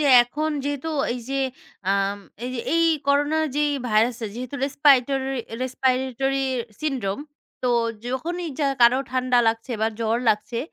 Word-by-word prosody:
যে, - - +1 0.2
এখন 300 +6 -2
যেহেতু 285 +2 -2 0.2
এই 250 - -4
যে 275 - -2 0.5
আম 195 0 +1 0.3
এই 250 - -3
যে 235 - -2
এই 335 0 +4 0.2
করোনা 290 +2 +2 0.2
যেই 295 0 +2 0.2
ভাইরাস 225 +3 +3
টা 225 - -2
যেহেতু 255 +3 -5
রেস্পাইটরি 275 -1 +3 0.3
respiratory 260 +1 0 0.4
syndrome, 265 -6 -2 0.4
তো 250 - +1 0.4
যখনই 335 +8 -3
যা 285 - +3
কারো 240 +2 +6
ঠান্ডা 255 -1 +2
লাগছে 225 +3 -2
বা 220 - +3
জ্বর 225 0 +1
লাগছে, 220 +2 0
260 Hz, 145 wpm, -24 LUFS, 235-285 Hz, 0.5 s, কারো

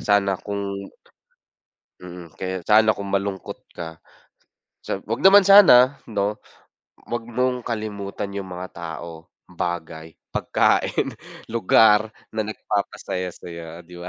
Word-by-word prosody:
sana 100 -2 +1
kung, 100 -1 -4 1.3
mm, 90 -2 -10
kaya 95 -2 -4
sana 110 0 +4
kung 100 -1 -6
malungkot 100 -1 -3 0.2
ka 80 -1 -8 1.1
wag 115 - -2
naman 200 +1 +9
sana 145 -10 +8
'no, 105 0 -1 0.7
wag 120 -1 -2
mong 125 +1 -1
kalimutan, 105 -3 -4
yung 100 -1 -5
mga 90 +1 -6
tao, 85 0 -8 0.2
bagay, 80 -2 -5 0.2
pagkain, - - +1 0.4
lugar, 110 -1 +4 0.2
na 110 - -1
nagpapasaya 100 -3 -3
sayo 85 0 -9
di 90 0 -12
ba? 90 - -7
100 Hz, 110 wpm, -23 LUFS, 90-110 Hz, 1.3 s, naman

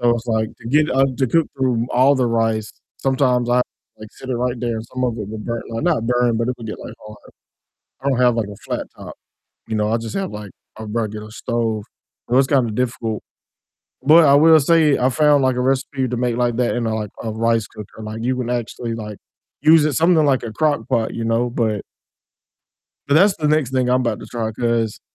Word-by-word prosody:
so 120 -1 +3
it's, 115 +1 -5
like, 110 -1 0
to 115 - -11
get, 150 +4 +3
uh, 135 +1 +3
to 130 -1 +1
cook 165 +5 +2
through 125 -3 +1
all 130 +3 +4
the 130 -2 +1
rice, 115 -2 0 0.3
sometimes 130 -2 +1
I 120 - +3
have 125 - +4
to, - - -37
like, 110 - -9
sit 130 - -12
it - - 0
right 125 0 -1
there 120 -2 -2
and 110 - -6
some 130 +2 -5
of 120 -2 0
it 105 -2 -5
will 110 - -6
burn 115 +2 -4
like, 115 +3 -4
not 155 -10 +1
burn, 120 -1 +2
but 115 +1 -1
it 125 - -1
would 115 - -8
get, 110 - -6
like, - - -9
hard. 105 0 -11 0.8
I 140 - 0
don't 130 -2 0
have, 125 -2 +4
like, 115 -3 -1
a 100 - -9
flat - - -3
top, - - -9 0.5
you 110 - -3
know, 105 0 0
I 115 - +2
just, 115 -1 -6
have, 195 -1 -2
like, 105 -2 -8 0.3
a 110 - -7
regular 110 -1 -4
stove, 115 -2 -2 0.5
so 125 - +3
it's, 135 0 +4
kinda, 130 -5 +2
difficult, 115 -2 -2 0.8
but 160 +4 +7
I 140 - +6
will 160 +2 +7
say 155 -1 +3
I 125 - +2
found, 145 +1 +3
like, 130 -1 +2
a 125 - -1
recipe 130 +1 0
to 125 0 -3
make, 120 -1 0
like, 120 -1 +1
that 125 -1 +1
in 120 -1 -1
a, 110 - -1
like, 105 -2 -4
a 110 - -3
rice 115 0 +1
cooker, 105 0 -11
like, 110 +1 -6
you 130 +1 0
can 125 -2 -3
actually, 120 -1 -3
like, 105 -2 -7 0.4
use 155 -1 +6
it 155 - 0
something 165 -1 +3
like 135 -3 +2
a 115 - -5
crock 145 -2 0
pot, 110 -1 0
you 115 - -4
know, 115 +2 +1
but 110 -3 -1 1.2
but 140 - +1
that's 190 +5 +5
the 150 -2 -1
next 150 -4 +1
thing 130 -1 +1
I'm 125 +1 +3
about 120 -2 -1
to - - -9
try 110 -2 -3
'cause 115 -1 -1
120 Hz, 240 wpm, -20 LUFS, 115-135 Hz, 1.2 s, but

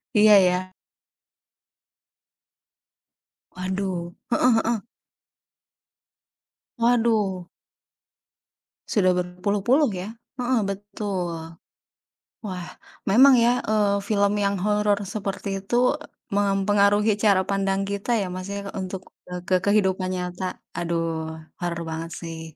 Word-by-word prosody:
Iya 210 0 +7
iya. 185 0 +1 2.8
Waduh. 185 -1 -3 0.2
Heeh - - +1 0.3
heeh. 230 -1 +1 2.0
Waduh. 220 -6 +2 1.4
Sudah 185 -4 +3
berpuluh-puluh, 200 - +1
ya. 185 +3 -5 0.3
Heeh, 250 -2 +1
betul. 190 -5 -4 0.9
Wah 180 -3 -5 0.4
memang, 260 +7 +7
ya, 240 +1 +3
eee, 205 -2 +2
film 200 0 +1
yang 200 0 +1
horor 210 +1 +2
seperti 195 -1 -4
itu 240 +5 +2 0.4
mempengaruhi 205 +1 +3
cara 200 -3 +4
pandang 195 0 0
kita, 200 +4 -1
ya, 195 -4 -1
Mas, 185 +1 -6
ya, 200 0 -4
untuk, 190 0 -6 0.2
eee, 180 0 -5
ke 185 -1 +2
kehidupan 190 -2 +2
nyata. 180 0 -4 0.2
Aduh, 165 -2 -2 0.2
horor 170 -1 -2
banget, 160 +1 -5
sih. 165 -1 -6
195 Hz, 95 wpm, -24 LUFS, 180-210 Hz, 2.8 s, Iya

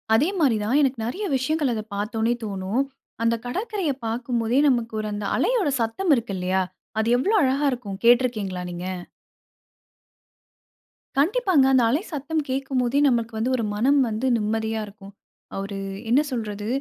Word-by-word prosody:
அதே 285 +8 +3
மாரி 255 -8 +3
தான், 235 +7 +2
எனக்கு 265 -4 +1
நிறைய 375 - -3
விஷயங்கள் 290 0 0
அத 215 - -2
பார்த்தோனே 220 +3 0
தோணும். 200 +4 -1 0.4
அந்த 230 0 +3
கடற்கரைய 385 - -2
பாக்கும் 235 +1 -1
போதே 235 +4 +2
நமக்கு 230 -4 0
அந்த 205 0 -4
அலையோட 455 -11 +2
சத்தம் 310 +11 0
இருக்கு 230 -4 -3
இல்லையா? 185 +1 0 0.4
அது 220 - +1
எவ்ளோ 405 - +1
அழகா 270 +3 +1
இருக்கும் 210 -6 -5
கேட்ருக்கீங்களா 230 -7 +3
நீங்க? 175 +1 -6 2.3
கண்டிப்பாங்க. 360 - +3
அந்த 255 - +5
அலை 290 +9 +1
சத்தம் 305 +2 -1
கேக்கும் 270 -1 -1
போதே, 250 +4 +1
நமக்கு 235 -1 0
வந்து 245 +4 0
ஒரு 230 - -1
மனம் 275 +7 +3
வந்து 220 +4 -2
நிம்மதியா 220 +1 -1
இருக்கும். 200 -1 -13 0.5
ஒரு 200 0 -6 0.3
என்ன 265 +5 +5
சொல்றது? 210 -3 -4
240 Hz, 145 wpm, -24 LUFS, 215-275 Hz, 2.3 s, அந்த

